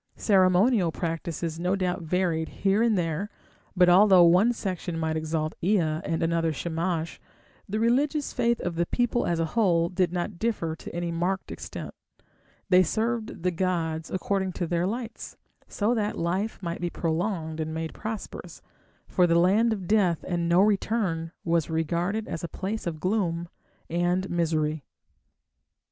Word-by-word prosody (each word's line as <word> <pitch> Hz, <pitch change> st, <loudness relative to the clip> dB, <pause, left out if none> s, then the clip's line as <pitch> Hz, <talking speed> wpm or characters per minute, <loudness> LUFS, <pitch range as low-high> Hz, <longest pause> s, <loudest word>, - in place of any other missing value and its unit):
Ceremonial 190 Hz, 0 st, +3 dB
practices 165 Hz, -1 st, -3 dB
no 180 Hz, +3 st, +1 dB
doubt 180 Hz, -2 st, -1 dB
varied 165 Hz, -1 st, 0 dB
here 200 Hz, +2 st, +1 dB
and 230 Hz, -3 st, +3 dB
there, 175 Hz, +4 st, -1 dB, 0.5 s
but 180 Hz, -1 st, +6 dB
although 185 Hz, 0 st, +7 dB
one 180 Hz, +7 st, +5 dB
section 185 Hz, -6 st, -4 dB
might 160 Hz, -1 st, -1 dB
exalt 155 Hz, 0 st, -2 dB
Ea 205 Hz, +4 st, +3 dB
and 160 Hz, +1 st, -1 dB
another 165 Hz, 0 st, +1 dB
Shamash, 165 Hz, +1 st, -3 dB, 0.5 s
the 215 Hz, +3 st, -1 dB
religious 275 Hz, +6 st, +1 dB
faith 235 Hz, 0 st, +1 dB
of 170 Hz, -1 st, -3 dB
the 170 Hz, 0 st, +1 dB
people 240 Hz, 0 st, 0 dB
as 170 Hz, -1 st, 0 dB
a 165 Hz, -, +2 dB
whole 170 Hz, -7 st, +3 dB
did 180 Hz, -1 st, 0 dB
not 175 Hz, +1 st, -3 dB
differ 205 Hz, -9 st, -1 dB
to 165 Hz, -, -10 dB
any 170 Hz, 0 st, -2 dB
marked 180 Hz, +3 st, -2 dB
extent; -, -, -7 dB, 0.7 s
they 185 Hz, -1 st, +6 dB
served 220 Hz, +1 st, -1 dB
the 180 Hz, -, +2 dB
gods 165 Hz, -3 st, -1 dB
according 190 Hz, 0 st, -1 dB
to 175 Hz, -, -2 dB
their 170 Hz, +1 st, 0 dB
lights, 230 Hz, +1 st, -6 dB, 0.3 s
so 215 Hz, +3 st, 0 dB
that 210 Hz, -3 st, -1 dB
life 185 Hz, +6 st, -1 dB
might 170 Hz, -1 st, -4 dB
be 175 Hz, -, -1 dB
prolonged 165 Hz, -1 st, -2 dB
and 160 Hz, 0 st, -2 dB
made 160 Hz, 0 st, -4 dB
prosperous, 220 Hz, -1 st, -7 dB, 0.4 s
for 180 Hz, -2 st, +3 dB
the 170 Hz, 0 st, +3 dB
land 205 Hz, +7 st, +4 dB
of 195 Hz, -5 st, -3 dB
death 190 Hz, -6 st, +2 dB
and 170 Hz, -1 st, -1 dB
"no 175 Hz, +2 st, +5 dB
return" 200 Hz, -5 st, 0 dB
was 170 Hz, -2 st, +1 dB
regarded 170 Hz, +7 st, -1 dB
as 165 Hz, -, -5 dB
a -, -, -2 dB
place 200 Hz, +4 st, -4 dB
of 160 Hz, -2 st, -4 dB
gloom 175 Hz, -3 st, -1 dB, 0.4 s
and 175 Hz, +2 st, 0 dB
misery. 155 Hz, -3 st, 0 dB
175 Hz, 155 wpm, -26 LUFS, 165-200 Hz, 0.7 s, although